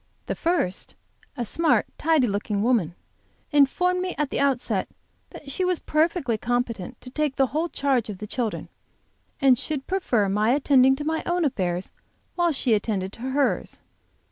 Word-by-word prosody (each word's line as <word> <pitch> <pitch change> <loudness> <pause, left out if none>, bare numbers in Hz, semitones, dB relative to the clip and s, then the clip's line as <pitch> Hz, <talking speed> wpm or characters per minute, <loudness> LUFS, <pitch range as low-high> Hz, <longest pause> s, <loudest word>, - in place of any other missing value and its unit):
The - - -2
first, 330 - -1 0.4
a 240 - -2
smart, 325 +7 +2
tidy 315 -4 +3
looking 205 -1 -1
woman, 215 -9 +1 0.6
informed 360 +6 +3
me 365 0 -3
at 300 -2 -1
the - - -1
outset 275 -3 0 0.4
that 275 - -9
she 370 - -1
was 365 -1 +1
perfectly 305 - 0
competent 240 -2 -2
to 250 - -10
take 300 -1 -1
the 270 - +3
whole 325 +3 0
charge 265 -7 0
of 205 - -5
the 210 - -6
children, 230 +1 -3 0.7
and 260 -3 +5
should 290 -4 -3
prefer 255 - +1
my 210 +4 +2
attending 265 -2 +4
to 295 - -5
my 320 +1 -1
own 350 -1 +1
affairs 180 -8 -1 0.4
while 345 -1 +2
she 265 -5 +1
attended 200 -3 -1
to - - -12
hers. 265 +2 -1
265 Hz, 165 wpm, -25 LUFS, 220-310 Hz, 0.7 s, and